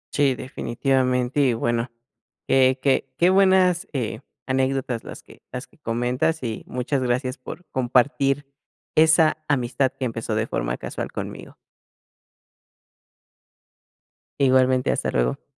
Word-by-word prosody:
Sí, 140 Hz, -3 st, +3 dB
definitivamente, 130 Hz, +1 st, -1 dB
y 130 Hz, -3 st, +3 dB
bueno, 120 Hz, +1 st, -1 dB, 0.6 s
qué 130 Hz, 0 st, +4 dB
qué 135 Hz, -2 st, +2 dB
qué 175 Hz, +2 st, +4 dB
buenas, 190 Hz, -1 st, +4 dB
eh, 115 Hz, -5 st, -3 dB, 0.3 s
anécdotas 130 Hz, -2 st, -1 dB
las -, -, -10 dB
que -, -, -17 dB
las 125 Hz, +1 st, -5 dB
que -, -, -27 dB
comentas, 125 Hz, +5 st, -1 dB
y 115 Hz, -3 st, -4 dB
muchas 125 Hz, +2 st, -2 dB
gracias 125 Hz, +1 st, -1 dB
por 175 Hz, +7 st, -9 dB
compartir 135 Hz, +2 st, +1 dB, 0.5 s
esa 160 Hz, 0 st, +5 dB
amistad 130 Hz, -1 st, +1 dB
que 130 Hz, -, -5 dB
empezó 115 Hz, -2 st, -3 dB
de 110 Hz, +1 st, 0 dB
forma -, -, -2 dB
casual -, -, -5 dB
conmigo. -, -, -7 dB, 2.8 s
Igualmente, 130 Hz, -1 st, +3 dB
hasta -, -, -1 dB
luego. 60 Hz, +2 st, 0 dB
130 Hz, 120 wpm, -23 LUFS, 120-140 Hz, 2.8 s, esa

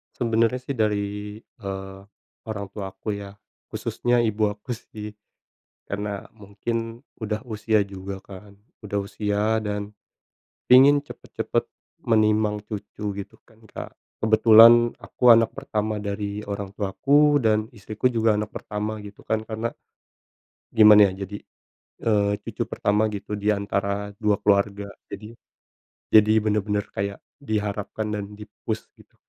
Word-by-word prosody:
Sebenernya 115 Hz, 0 st, +2 dB
sih 135 Hz, -, -5 dB
dari, 105 Hz, -3 st, -1 dB
eee, 95 Hz, 0 st, -8 dB, 0.5 s
orang 100 Hz, -2 st, -4 dB
tua 100 Hz, -1 st, -5 dB
aku 105 Hz, -, -4 dB
ya, 100 Hz, 0 st, -9 dB, 0.3 s
khususnya 120 Hz, 0 st, 0 dB
ibu 110 Hz, -1 st, +1 dB
aku 105 Hz, +5 st, -6 dB
sih. 105 Hz, -2 st, -7 dB, 0.8 s
Karena 100 Hz, 0 st, -3 dB, 0.2 s
mungkin 115 Hz, +3 st, -4 dB, 0.2 s
udah 110 Hz, -1 st, -3 dB
usia 110 Hz, 0 st, +1 dB
juga 95 Hz, -1 st, -6 dB
kan. 100 Hz, +1 st, -12 dB, 0.3 s
Udah 100 Hz, 0 st, -1 dB
usia 105 Hz, +2 st, 0 dB
dan 105 Hz, 0 st, -3 dB, 0.8 s
ingin 140 Hz, +3 st, +8 dB
cepet-cepet -, -, -3 dB, 0.3 s
menimang 110 Hz, -2 st, +2 dB
cucu 105 Hz, -1 st, -5 dB
gitu 100 Hz, 0 st, -8 dB
kan, 110 Hz, 0 st, -24 dB
Kak. -, -, -8 dB, 0.3 s
Kebetulan 115 Hz, +2 st, +7 dB
aku 125 Hz, -, +1 dB
anak 115 Hz, -1 st, +6 dB
pertama 105 Hz, 0 st, -3 dB
dari 100 Hz, 0 st, -3 dB
orang 100 Hz, -1 st, -4 dB
tuaku 140 Hz, +9 st, +3 dB
dan 110 Hz, -4 st, +1 dB
istriku 110 Hz, +1 st, -2 dB
juga 115 Hz, -2 st, +2 dB
anak 105 Hz, +1 st, -2 dB
pertama 105 Hz, +1 st, -4 dB
gitu 100 Hz, 0 st, -12 dB
kan, 110 Hz, 0 st, -2 dB
karena 110 Hz, +1 st, -3 dB, 1.0 s
gimana 105 Hz, -2 st, +7 dB
ya, 95 Hz, +1 st, -6 dB
jadi, 100 Hz, +2 st, -7 dB, 0.7 s
eee, 100 Hz, -2 st, +3 dB
cucu -, -, -5 dB
pertama 105 Hz, +1 st, +1 dB
gitu 105 Hz, 0 st, -5 dB
di 105 Hz, +1 st, 0 dB
antara 100 Hz, 0 st, -2 dB
2 105 Hz, -2 st, +3 dB
keluarga, 100 Hz, 0 st, +2 dB, 0.2 s
jadi 105 Hz, +3 st, -8 dB, 0.8 s
jadi 110 Hz, 0 st, +7 dB
bener-bener 105 Hz, -1 st, 0 dB
kayak 100 Hz, 0 st, -3 dB, 0.2 s
diharapkan 105 Hz, -4 st, -3 dB
dan 100 Hz, -, -4 dB
di-push 105 Hz, -, -5 dB, 0.2 s
gitu. -, -, -21 dB
105 Hz, 125 wpm, -24 LUFS, 100-110 Hz, 1.0 s, ingin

